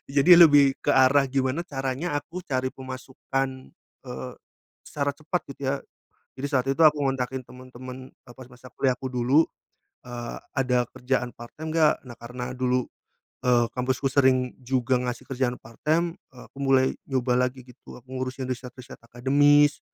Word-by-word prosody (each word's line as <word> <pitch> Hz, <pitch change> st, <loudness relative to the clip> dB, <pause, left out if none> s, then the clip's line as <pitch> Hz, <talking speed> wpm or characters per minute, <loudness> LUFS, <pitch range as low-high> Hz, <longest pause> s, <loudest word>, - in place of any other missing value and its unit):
Jadi 140 Hz, +5 st, +5 dB
lebih 145 Hz, -5 st, +7 dB
ke -, -, +1 dB
arah, 130 Hz, +2 st, +5 dB
gimana 135 Hz, +4 st, 0 dB
caranya 135 Hz, +4 st, -3 dB
aku 165 Hz, +5 st, -8 dB
cari 130 Hz, -3 st, -1 dB
pemasukan, 130 Hz, +1 st, -4 dB, 0.6 s
eee, 125 Hz, 0 st, -6 dB, 0.5 s
secara 145 Hz, -1 st, -1 dB
cepat 160 Hz, +3 st, -3 dB
gitu, 140 Hz, -, -11 dB
ya. 140 Hz, -, 0 dB, 0.6 s
Jadi 135 Hz, -, -2 dB
saat 130 Hz, -1 st, +1 dB
itu 135 Hz, +4 st, +1 dB
aku 150 Hz, -1 st, +4 dB
ngontakin 130 Hz, -1 st, -1 dB
temen-temen, 130 Hz, +1 st, -10 dB
eee, 120 Hz, -, -17 dB
pas 130 Hz, -, -10 dB
masa 125 Hz, +1 st, -14 dB
kuliah 130 Hz, -2 st, +2 dB
aku 130 Hz, -, -5 dB
dulu, 125 Hz, +5 st, +3 dB, 0.6 s
eee, 120 Hz, -1 st, -6 dB, 0.2 s
"Ada 125 Hz, -2 st, +2 dB
kerjaan 125 Hz, -1 st, -1 dB
part-time 150 Hz, +7 st, -8 dB
nggak?" 160 Hz, -2 st, +5 dB
Nah, 120 Hz, -, -10 dB
karena 125 Hz, +1 st, -6 dB
dulu, 125 Hz, 0 st, +1 dB, 0.6 s
eee, 120 Hz, -1 st, +3 dB
kampusku 130 Hz, +2 st, -1 dB
sering 130 Hz, -2 st, +3 dB
juga 125 Hz, 0 st, +1 dB
ngasih 125 Hz, -1 st, -4 dB
kerjaan 130 Hz, -2 st, -1 dB
part-time, 160 Hz, +8 st, -1 dB, 0.2 s
eee, 125 Hz, -2 st, -14 dB
aku -, -, -32 dB
mulai 135 Hz, -1 st, +3 dB, 0.2 s
nyoba 130 Hz, -2 st, +1 dB
lagi, 130 Hz, 0 st, -14 dB
gitu. 125 Hz, 0 st, -14 dB
Aku 125 Hz, -, -21 dB
ngurusin 130 Hz, 0 st, -4 dB
riset-riset 125 Hz, 0 st, -7 dB
akademis, 145 Hz, +5 st, +3 dB
130 Hz, 155 wpm, -25 LUFS, 125-140 Hz, 0.6 s, lebih